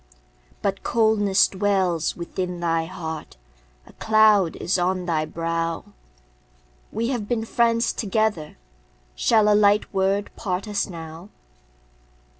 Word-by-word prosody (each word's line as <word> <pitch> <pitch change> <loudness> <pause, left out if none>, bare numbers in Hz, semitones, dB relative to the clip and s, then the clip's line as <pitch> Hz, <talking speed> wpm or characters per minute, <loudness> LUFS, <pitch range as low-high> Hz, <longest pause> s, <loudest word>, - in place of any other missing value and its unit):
But 195 -1 -1
coldness 215 -4 +3
dwells 190 -4 0
within 180 +1 -4
thy 165 -1 0
heart, 160 - -7 0.5
A - - -17
cloud 215 -5 +3
is 185 +1 -1
on 180 0 0
thy 160 -3 0
brow; 165 +1 -3 1.1
We 230 +3 -2
have 235 -6 -3
been 225 -1 -1
friends 230 0 +1
together, 210 -6 -1 0.6
Shall 215 - +3
a 210 - +5
light 205 0 +3
word 195 +1 0
part 185 0 -3
us 205 -1 -1
now? 165 +1 -9
195 Hz, 115 wpm, -23 LUFS, 170-215 Hz, 1.1 s, a